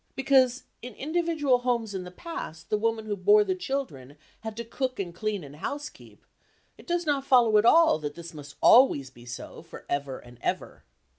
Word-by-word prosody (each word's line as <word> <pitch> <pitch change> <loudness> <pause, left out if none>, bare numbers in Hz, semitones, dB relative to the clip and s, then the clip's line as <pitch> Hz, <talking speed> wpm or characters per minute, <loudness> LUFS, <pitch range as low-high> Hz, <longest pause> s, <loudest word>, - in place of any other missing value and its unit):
Because, 265 -2 +3 0.2
in 245 -2 -9
individual 310 -4 +1
homes 235 -4 -1
in 185 -2 -4
the - - -8
past 180 - -8
the 210 - +3
woman 225 0 -1
who 210 -1 -2
bore 205 +2 +5
the 190 -2 -1
children 180 - -5 0.2
had 220 -1 -7
to 235 - -5
cook 255 +1 -3
and 175 -3 -4
clean 205 +1 -3
and 145 +1 -12
housekeep, 290 - -7 0.5
it - - -17
does 345 -1 -1
not 285 -3 0
follow 245 -5 +4
at 210 - +1
all 325 - +6
that 145 -1 -5
this 170 -1 -9
must 145 -2 -11
always 145 - +6
be 120 -1 -16
so 120 - -8
for - - -12
ever 140 -2 -2
and 120 0 -15
ever. - - -3
220 Hz, 195 wpm, -27 LUFS, 165-265 Hz, 0.5 s, all